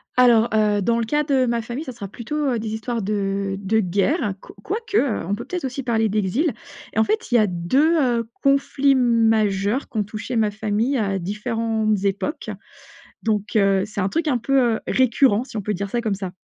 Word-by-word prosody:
Alors, 240 -2 +5
heu, 210 -1 +2
dans 230 +4 +1
le - - 0
cas 295 +6 +1
de 270 -3 +2
ma 235 -1 0
famille, 240 +6 -5
ça 260 - -6
sera 215 -5 -7
plutôt, 235 +8 -7 0.2
heu, 235 - -1
des 220 0 -4
histoires 230 +1 -3
de 195 -1 -1
de 210 +3 +1
guerre, 205 - 0
qu - - -13
quoique, 435 +1 -2
heu, 270 - +1
on 200 - 0
peut 235 +3 -7
peut-être 350 +1 -4
aussi 265 +1 -4
parler 225 -3 +1
d'exil. 215 - 0 0.4
En 220 - +4
fait, 435 - -2
il - - +3
y - - +8
a 215 - +4
2, 260 - +2
heu, 235 -3 +1
conflits 275 0 +3
majeurs 225 -2 +2
qui - - -7
ont 210 - +2
touché 215 +4 -6
ma 220 -2 +2
famille 215 +5 -1
à 195 -4 0
différentes 215 +2 -1
époques. 200 - -2 0.7
Donc, 215 0 -1
heu, 195 -2 +3
c'est 210 -2 -4
un 190 - 0
truc 325 +8 -1
un 265 -4 +2
peu, 275 +4 +1 0.2
heu, - - -9
récurrent 250 -3 +3
si 255 - -8
on - - -2
peut 210 +2 -2
dire 200 +2 -4
ça 240 - 0
comme 215 -4 -1
ça. 190 -2 -5
225 Hz, 215 wpm, -22 LUFS, 205-255 Hz, 0.7 s, y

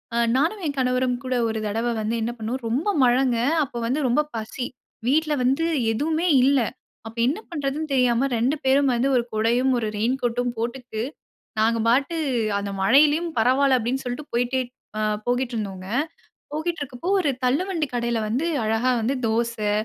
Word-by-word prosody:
ஆ - - +1 0.2
நானும் 330 +10 +1
என் 285 - -2
கணவரும் 255 -1 +1
கூட 255 0 -1
ஒரு 220 -1 -2
தடவை 225 +3 -1
வந்து 220 +2 -1
என்ன 230 +2 -1
பண்னோம் 230 +4 -3
ரொம்ப 275 - 0
மழைங்க 250 -1 +3 0.3
அப்போ 250 -3 -7
வந்து 255 +6 0
ரொம்ப 245 +5 +3
பசி. 225 +3 -4 0.4
வீட்ல 305 +3 +2
வந்து 270 +6 +2 0.3
எதுவுமே 315 +9 0 0.2
இல்ல. 275 0 +4 0.5
அப்போ 225 +1 -8
என்ன 295 +10 0
பண்ணுறதுன்னு 300 -1 -3
தெரியாம 250 0 +3
ரெண்டு 255 +6 +1
பேரும் 270 0 +4
வந்து 245 +3 +1
1 240 - +3
குடையும் 240 +4 +2
1 220 - -2
ரெயின்கோட்டும் 245 +1 0
போட்டுட்டு, 235 -1 -4 0.6
நாங்க 230 +1 +3
பாட்டு 275 +7 +2 0.4
அந்த 200 0 -4
மழையிலும் 295 - +4
பரவாயில்ல 260 +3 +4
அப்படின்னு 250 +3 -2
சொல்லிட்டு 250 +4 -4
போயிட்டே 245 +2 +1 0.7
போய்ட்டு 245 0 0
இருந்தோம். 195 -3 -4 0.7
போயிட்டு 325 +3 -2
இருக்குறப்போ 285 +5 -4
ஒரு 300 - +1
தள்ளுவண்டி 320 +5 +1
கடையில 235 -1 0
வந்து 255 +10 0 0.2
அழகா 225 +4 +1
வந்து 235 +5 0
தோசை, 225 -2 0
250 Hz, 155 wpm, -24 LUFS, 230-280 Hz, 0.7 s, இல்ல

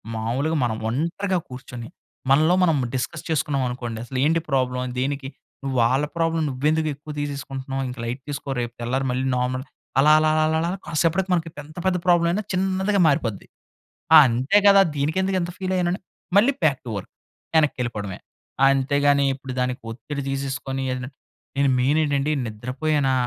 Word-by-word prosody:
మామూలుగా 130 +9 -1
మనం 115 -3 -1
ఒంటరిగా 170 - -1
కూర్చొని, 125 -2 -8 0.4
మనలో 155 +6 +5
మనం 165 -4 +3 0.2
డిస్కస్ 125 - -3
చేసుకున్నాం 145 -3 0
అనుకోండి 120 -2 -5
అసలు, 130 +1 -5
ఏంటి 165 +2 +2
ప్రాబ్లమ్, 125 -2 0
దేనికి 135 +1 -2 0.3
నువ్వు 135 -1 -2
వాళ్ళ 130 +5 +2
ప్రాబ్లమ్ 165 -1 +1
నువ్వెందుకు 155 +4 0
ఎక్కువ 150 +2 -9
తీసేసుకుంటున్నావు, 135 -2 -4
ఇంక 125 - -8
లైట్ 120 +3 -4
తీసుకో 140 -1 -4
రేపు 120 0 -4
తెల్లారి 130 +3 -1
మళ్ళీ 130 +1 -1
నార్మల్ 130 +1 -1 0.4
అలా, 150 +2 +6
అలా, 155 0 +3
అలా, 155 - +3 0.2
అలా, 165 - 0
అలా 190 - -5
కాసేపటికి 170 +4 +1
మనకు 170 -2 0 0.2
ఎంత 155 +3 -16
పెద్ద 185 -1 +2
ప్రాబ్లమయినా 175 +2 +3
చిన్నదిగా 190 +2 +1
మారిపోద్ది. 130 -9 0 0.7
ఆ! - - +12
అంతే 130 - +2
కదా! 200 -1 +8 0.2
దీనికెందుకు 185 +7 0
ఇంత 175 0 -3
ఫీల్ 190 0 -2
అయ్యానని, 180 +1 0 0.4
మళ్ళీ 235 +7 +5
బ్యాక్ 145 -4 +3
టు - - -5
వర్క్ 95 - -8 0.5
వెనక్కి 150 -2 +3
వెళ్ళిపోవడమే. 105 -6 -4 0.5
అంతేగాని 140 +1 +3
ఇప్పుడు 135 -1 -8
దానికి 125 0 -2
ఒత్తిడి 140 +5 -6
తీసేసుకొని, 135 -1 -3
ఎదన 125 0 -5 0.5
నేను 140 0 +3
మెయిన్ 135 +5 +2
ఏంటండి 145 -1 +1
నిద్రపోయానా 130 +6 -1
140 Hz, 155 wpm, -23 LUFS, 130-160 Hz, 0.7 s, ఆ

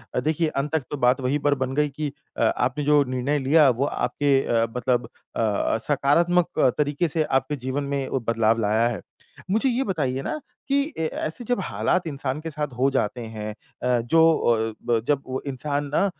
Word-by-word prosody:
अ, - - +2
देखिए 155 +5 0
अंत 145 -1 -2
तक 155 - 0
तो 145 - -2
बात 125 0 +3
वही 130 +3 +1
पर 145 - +4
बन 130 0 -3
गई 150 0 +2
कि 145 +1 -4 0.3
अ, - - +1
आपने 130 +4 0
जो 145 0 +4
निर्णय 130 +3 -1
लिया 145 +2 +5
वो 125 +2 +1
आपके 140 -1 +1
अ, 115 -1 +2
मतलब 125 0 +1 0.3
अ, 110 -1 +1
सकारात्मक 165 +5 +2 0.2
तरीके 150 +3 +1
से 160 +1 +1
आपके 140 +1 0
जीवन 135 +2 -1
में 135 -1 -1
ओ 135 - -1
बदलाव 115 0 +2
लाया 110 +3 +2
है। 120 - -3 0.5
मुझे 225 +6 +2
ये 250 +2 +1
बताइए 140 - -1
ना 305 - -3 0.3
कि 280 0 +2
अ, 275 - -7
ऐसे 160 +6 -3
जब 245 +1 0
हालात 180 -2 0
इंसान 140 -1 -3
के 165 - -5
साथ 150 0 -2
हो 135 +2 +3
जाते 120 0 -1
हैं 110 -2 -6 0.3
अ, 125 -1 +2
जो 160 +7 +4
अ, 115 0 0
जब 145 -2 +2
वो 130 0 -3
इंसान 145 +2 -2
ना 175 - +3
140 Hz, 195 wpm, -24 LUFS, 125-155 Hz, 0.5 s, लिया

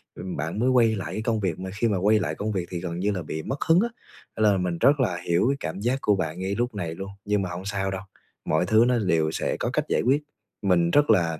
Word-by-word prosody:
ừm, 95 - -6
bạn 80 +7 -3
mới 125 +2 +2
quay 115 -3 +4
lại 95 - -5
cái 110 - -3
công 110 -1 0
việc, 90 -4 -2
mà 95 0 -5
khi 115 +3 0
mà 100 -3 +1
quay 105 +3 +3
lại 80 -4 -2
công 105 +1 -3
việc 95 -3 -2
thì 90 - -3
gần 85 -1 -4
như 105 +2 +1
là 90 -3 -3
bị 80 0 -5
mất 140 - -4
hứng 165 +2 +5
á. 235 - 0 0.5
Nên 110 - +1
là 95 - +2
mình 90 -2 -1
rất 140 - +4
là 90 -9 +1
hiểu 85 +7 +3
cái 140 - 0
cảm 85 +3 -4
giác 125 +5 0
của 105 - +3
bạn 90 -2 -3
ngay 95 +2 -2
lúc 120 -1 -2
này 85 -4 -4
luôn, 95 +2 -7
nhưng 105 -1 +1
mà 90 - -3
hông 90 +2 -6
sao 95 -1 -2
đâu, 95 0 -4 0.4
mọi 80 +3 +1
thứ 110 +3 +4
nó 125 -2 +2
đều 80 -6 +1
sẽ - - -2
có - - -1
cách - - 0
giải - - +1
quyết. 140 +5 +2 0.4
Mình 85 -3 +2
rất 145 0 +4
là 80 -3 +3
95 Hz, 290 wpm, -25 LUFS, 90-110 Hz, 0.5 s, hứng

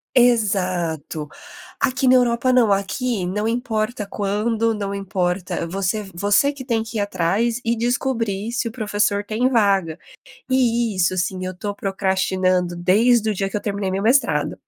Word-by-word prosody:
Exato. 185 - +1 0.5
Aqui 255 +1 +1
na 255 - +6
Europa 245 0 +2
não, 240 -5 +4
aqui 200 +1 -1
não 210 +4 -2
importa 225 -3 -2
quando, 220 +3 0
não 200 -2 -4
importa 180 -3 -2
você 195 +3 -2
você 205 +10 +3
que 270 -3 -9
tem 230 -3 0
que 225 0 -6
ir - - 0
atrás 205 +5 0
e 235 +1 +1
descobrir 230 -3 -1
se 240 0 -1
o - - -4
professor 205 -3 0
tem 220 +5 0
vaga. 195 -8 +1 0.5
E 235 -4 +1
isso 185 0 +2
assim 185 +1 -2
eu 185 - -3
estou 205 +3 -5
procrastinando 190 -2 0
desde 220 +5 +3
o - - -1
dia 195 0 -2
que 210 - -2
eu - - -5
terminei 200 -2 -2
meu 195 +2 -2
mestrado. 255 +5 +2
210 Hz, 160 wpm, -21 LUFS, 190-235 Hz, 0.5 s, na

